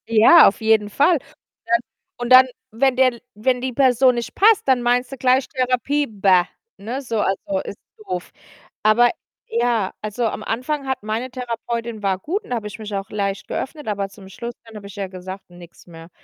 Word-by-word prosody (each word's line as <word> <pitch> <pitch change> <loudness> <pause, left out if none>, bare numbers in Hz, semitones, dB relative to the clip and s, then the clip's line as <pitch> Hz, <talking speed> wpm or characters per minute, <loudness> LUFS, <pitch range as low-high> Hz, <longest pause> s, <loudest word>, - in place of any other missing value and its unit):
Ja, 230 +9 +7
auf 195 - 0
jeden 220 -1 +3
Fall, 290 - +3
und - - -11 0.5
dann 235 0 +3 0.4
und 240 0 -4
dann, 255 +1 +9 0.2
wenn 250 +4 +2
der 255 -1 +4
L 235 - -14
wenn 245 +4 0
die 260 0 -3
Person 255 -1 +4
nicht 235 -1 -5
passt, 425 -4 +4
dann 260 -2 +3
meinst 245 +1 +1
du 270 - -7
gleich 255 +1 +2
Therapie: 260 +2 0
„Bäh“, 195 -4 +3 0.3
ne, 240 +7 -5
so 230 -5 -3
also, 195 0 -1
ist 200 - -8 0.2
doof. 185 -4 -6 0.5
Aber 225 +3 +5 0.4
ja, 235 -4 0
also, 215 +3 -2
am - - -5
Anfang 270 +5 -3
hat 265 -5 -2
meine 220 +4 -3
Therapeutin 235 -2 -5
war 195 -2 0
gut 375 - -3
und - - -16
da - - +1
habe 215 -3 -4
ich 210 - -9
mich 210 -1 -7
auch 195 0 -4
leicht 200 -1 -3
geöffnet, 295 0 -5
aber 200 -2 -2
zum 195 -1 -14
Schluss 235 +5 -7
dann 225 -1 -14
habe 205 -1 -9
ich 200 - -12
ja 200 -2 -4
gesagt: 185 +1 -9
„Nix 175 0 -15
mehr!“ 165 -1 -12
230 Hz, 205 wpm, -21 LUFS, 205-255 Hz, 0.5 s, dann